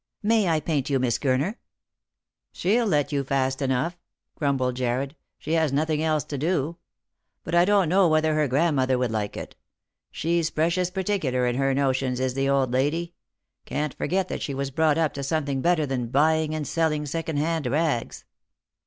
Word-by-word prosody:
May 215 -2 +3
I 160 -1 +2
paint 150 -3 -1
you. 140 - +2
Miss 125 -3 0
Gurner? 140 - 0 0.5
" - - -64
She'll 225 +5 +1
let 150 -6 +1
you 140 -1 0
fast 135 0 -1
enough," 135 +6 -1 0.3
grumbled 130 -4 0
Jarred. 130 +3 -1
" - - -58
She 155 - -6
has 160 -3 +2
nothing 155 +2 0
else 155 -2 +1
to 145 - -5
do. 165 0 -1 0.7
But - - -6
I 175 0 +5
don't 200 -2 +3
know 185 +2 +4
whether 155 0 +2
her 155 -1 +2
grandmother 135 -2 +2
would 125 -2 0
like 105 -2 -3
it. - - -7 0.5
She's 165 0 0
precious 170 +3 0
particular 180 -10 -1
in 120 0 0
her 135 0 +1
notions, 130 -2 0
is 130 -1 0
the 135 +1 0
old 135 -3 +2
lady 160 +6 0 0.3
— - - -56
can't 150 +1 -2
forget 190 0 -1
that - - -4
she 140 - -3
was 135 0 -3
brought 155 +1 +2
up 160 -2 +1
to 140 - -5
something 140 -2 -1
better 170 -2 +2
than 130 -3 -2
buying 155 +3 +2
and 150 -3 -3
selling 155 -2 0
second 160 +1 -3
hand 160 -1 0
rags." 145 -2 -1
150 Hz, 190 wpm, -25 LUFS, 135-165 Hz, 0.7 s, I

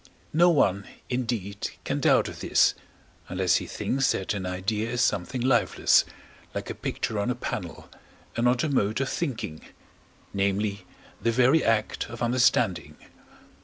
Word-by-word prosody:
No 170 +3 +5
one, 100 - +2 0.2
indeed, 115 -5 -2
can - - -2
doubt - - +4
of - - -8
this, - - +3 0.6
unless 90 -1 +2
he - - -5
thinks 135 0 0
that 95 - -2
an 95 -3 -4
idea 105 +5 -2
is 120 0 -1
something 105 +6 0
lifeless, 125 -1 +3 0.5
like - - -4
a - - -3
picture 110 -2 -3
on 100 - 0
a 125 - 0
panel, 125 - -5 0.5
and 120 - 0
not 125 0 +3
a 155 - 0
mode 110 -4 +1
of 135 - -1
thinking 120 - -3 0.7
namely, 100 0 -1 0.3
the 115 - +1
very 130 +7 +4
act 110 -1 0
of 120 0 -6
understanding. 120 +1 +2
115 Hz, 150 wpm, -26 LUFS, 100-125 Hz, 0.7 s, No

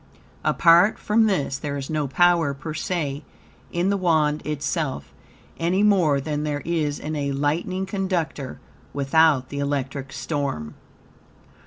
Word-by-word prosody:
Apart 175 +4 +5
from 220 +1 +2
this 140 -9 -1
there 145 -1 -3
is 135 -1 -5
no 155 -2 -1
power, 170 -1 +3
per 150 +3 -6
se, 150 -3 -3 0.5
in 175 +3 +1
the 200 - +1
Wand 155 -5 +2
itself, 145 - -3 0.5
any 180 +4 +1
more 180 -9 +4
than 150 +1 -3
there 145 -1 -2
is 155 -4 -1
in 155 +1 -5
a 140 -1 -1
lightning 165 +7 -1
conductor 185 -8 -3 0.4
without 140 -1 +3
the 140 - -5
electric 140 -1 -3
storm. 130 - -3
150 Hz, 135 wpm, -23 LUFS, 140-175 Hz, 0.5 s, Apart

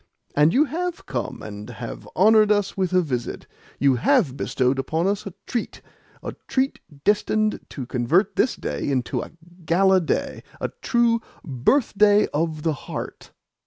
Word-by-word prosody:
And 150 +2 +5
you 285 - +4
HAVE 345 +3 -4
come, 120 - -4 0.2
you - - -9
HAVE - - -8
honoured 215 +2 +5
us 205 -2 +1
with 185 -2 -1
a 185 -1 +3
visit, 125 -6 -4 0.3
you 135 -2 +3
HAVE 175 - +2
bestowed 130 -1 0
upon 160 +6 -1
us 205 +1 -1
a 195 - -7
treat 240 -3 -4 0.4
a - - -5
treat 265 +1 0 0.2
destined 215 +1 +1
to 135 - -6
convert 130 - +1
this 255 - +2
day - - -3
into 130 -3 -1
a - - -7 0.3
gala 190 +3 +4
day, 160 - -2 0.2
a - - -2
true 235 -1 +2 0.2
birthday 205 - +3
of 155 0 -1
the 160 - +1
heart." 145 - -7
185 Hz, 155 wpm, -23 LUFS, 145-215 Hz, 0.4 s, And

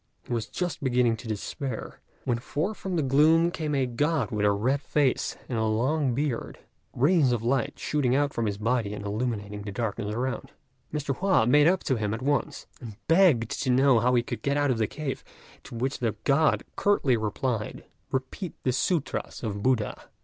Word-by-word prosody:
He - - -5
was 115 -1 -2
just 180 -5 -3
beginning 125 -3 +2
to 115 - -10
despair, 110 +4 -5 0.2
when 120 -1 0
forth 150 - -2
from 190 -2 -4
the 160 - +1
gloom 155 +5 +4
came 155 -4 -2
a 135 -2 +2
God 140 +1 0
with 105 -1 +1
a - - +4
red 125 +8 0
face 145 -4 0
and 120 -3 -2
a 110 - +1
long 125 +5 +1
beard, 140 -4 -2 0.3
rays 145 0 +3
of 120 -2 -1
light 135 +3 0
shooting 130 -4 0
out 145 0 +1
from 115 -2 -1
his 100 -1 -2
body 110 -1 0
and 105 - -7
illuminating 105 -1 -3
the 100 0 -6
darkness 105 0 -3
around. 130 +2 -3 0.4
Mr. 145 -2 -2
Hua 190 - +3
made 145 +5 +5
up 185 +1 +2
to 130 - 0
him 105 0 -1
at 115 - -7
once, 145 +1 -1 0.2
and 115 -4 -8
begged 165 - +4
to 130 - -1
know 130 -1 +5
how 125 +2 +2
he 120 - +3
could - - -5
get 140 0 0
out 145 -2 +2
of 120 - -1
the 110 - +2
cave; 145 +1 -5 0.4
to - - -9
which 130 +4 -2
the 115 -4 -1
God 150 +2 +3
curtly 175 -11 +2
replied, 110 +1 -2 0.3
"Repeat 135 +7 -3
the 130 - +2
sûtras 150 +2 -1
of 105 -3 -3
Buddha!" 120 -3 0
130 Hz, 195 wpm, -27 LUFS, 115-145 Hz, 0.4 s, made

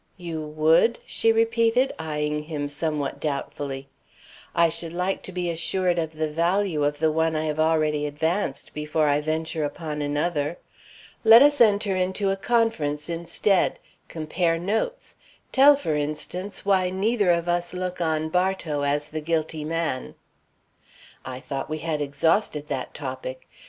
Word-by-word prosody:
"You 170 -3 -5
would?" 155 +9 +3
she 225 - +2
repeated, 230 +3 +2
eying 150 -1 -2
him 150 -2 -3
somewhat 150 -1 -2
doubtfully. 140 -2 -4 0.7
"I 170 0 +5
should 165 0 -5
like 180 +2 -1
to - - -8
be 175 -1 -2
assured 175 +1 0
of 160 -1 -3
the 155 0 -1
value 170 0 +1
of 145 0 0
the 160 +1 +2
one 160 +1 +1
I 155 0 -1
have 155 0 -2
already 155 -2 +2
advanced, 155 0 -2
before 150 0 0
I 145 0 +2
venture 160 +1 -2
upon 150 0 -4
another. 145 +2 -1 0.7
Let 225 +3 +9
us 290 -2 +4
enter 205 -3 +4
into 190 +2 0
a - - +1
conference 195 -10 0
instead; 170 +3 +1 0.3
compare 165 +1 -1
notes; 220 - -3 0.3
tell, 280 +2 +7
for 275 - -2
instance, 155 +7 -3
why 190 -2 +3
neither 205 +2 +1
of 170 0 +2
us 175 0 0
look 180 0 -4
on 160 -1 0
Bartow 180 -4 0
as 145 +1 0
the 155 0 -4
guilty 160 -1 -1
man." 160 -4 -2 1.1
"I 130 -1 -6
thought 135 +2 -5
we 155 - -2
had 155 -1 -2
exhausted 150 +2 +1
that 135 -3 -4
topic. 130 -2 -6
160 Hz, 150 wpm, -25 LUFS, 150-185 Hz, 1.1 s, Let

